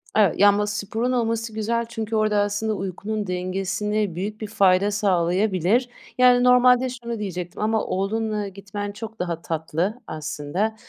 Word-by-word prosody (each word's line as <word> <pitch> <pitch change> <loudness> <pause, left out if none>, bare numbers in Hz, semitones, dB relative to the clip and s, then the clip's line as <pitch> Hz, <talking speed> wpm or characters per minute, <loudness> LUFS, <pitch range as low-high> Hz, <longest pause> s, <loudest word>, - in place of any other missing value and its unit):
Ev 205 -5 +5
ya, 205 +1 +7
ama 205 +1 +1
sporun 210 +4 -2
olması 230 -2 -1
güzel 230 +2 -1
çünkü 225 -1 -4
orada 215 -1 +2
aslında 205 +2 0
uykunun 200 +2 -4
dengesine 190 +2 -2
büyük 210 +5 -4
bir 215 - -3
fayda 195 -1 +3
sağlayabilir. 195 +3 +1 0.3
Yani 250 -1 +6
normalde 250 0 +5
şunu 235 -2 -6
diyecektim 180 -2 -5
ama 220 0 +1
oğlunla 210 +2 -1
gitmen 200 +1 -6
çok 220 +2 -9
daha 170 -2 -3
tatlı 165 +8 -2
aslında. 155 +8 -3
210 Hz, 145 wpm, -23 LUFS, 190-225 Hz, 0.3 s, ya